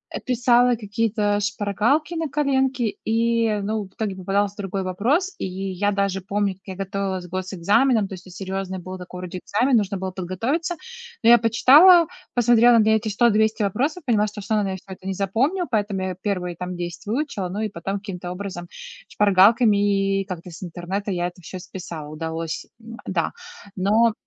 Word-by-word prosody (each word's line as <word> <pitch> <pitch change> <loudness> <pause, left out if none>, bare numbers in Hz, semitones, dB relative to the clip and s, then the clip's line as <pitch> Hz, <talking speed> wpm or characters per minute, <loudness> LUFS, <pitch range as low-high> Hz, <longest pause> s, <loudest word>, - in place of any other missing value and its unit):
э, - - -2
писала 245 -1 +3
какие-то 210 -1 0
шпаргалки 210 - 0
на 320 -2 -2
коленки, 265 -6 0
и, 230 -1 +1
ну, 215 +1 -1
в 190 - -19
итоге 210 -4 -3
попадался 195 +2 -1
другой 195 -1 -3
вопрос. 250 - 0
И - - -2
я 190 +1 -2
даже 195 -1 -1
помню, 200 +1 -1
как 190 - -32
я 190 - -7
готовилась 195 -1 -3
к - - -17
госэкзаменам, 200 +5 +1
то - - -9
есть 185 0 -10
это 180 - -12
серьезный 190 -1 -4
был 185 +1 -7
такой 180 0 -9
вроде 180 0 -6
экзамен, 245 +7 +2
нужно 200 -2 -1
было 190 0 -4
подготовиться. 225 - -2 0.5
Но 230 - +6
я 240 - +9
почитала, 300 - +7 0.3
посмотрела 240 0 +5
на 215 - +4
эти 220 0 +2
100-200 220 0 +2
вопросов 275 - -1
и 245 - 0
поняла, 210 -1 +3
что 210 0 -8
я - - -6
всё 210 - -2
равно, 210 - +2
наверное, 190 -1 -2
всё 190 - -8
это 185 +1 -11
не 195 - -1
запомню, 245 - 0
поэтому 205 -4 -1
я 185 -1 -3
первые 180 -4 -2
там 180 +1 -5
10 175 +3 -6
выучила, 215 -5 -2
ну 200 +3 -4
и 215 - -1
потом, 195 +2 -4
каким-то 180 -3 -6
образом, 180 -2 -6 0.4
шпаргалками 210 +3 +5 0.2
и 195 0 +1
и 195 - -1
как-то 180 -2 -7
с 165 - -10
интернета 185 +4 -4
я 175 -1 -1
это 180 0 -11
всё 180 +3 -8
списала, 170 -5 -8
удалось 160 +1 -4 0.2
М, 230 0 -10
да. 170 -4 -1 0.4
Но 215 +4 +3
200 Hz, 190 wpm, -23 LUFS, 185-230 Hz, 0.5 s, я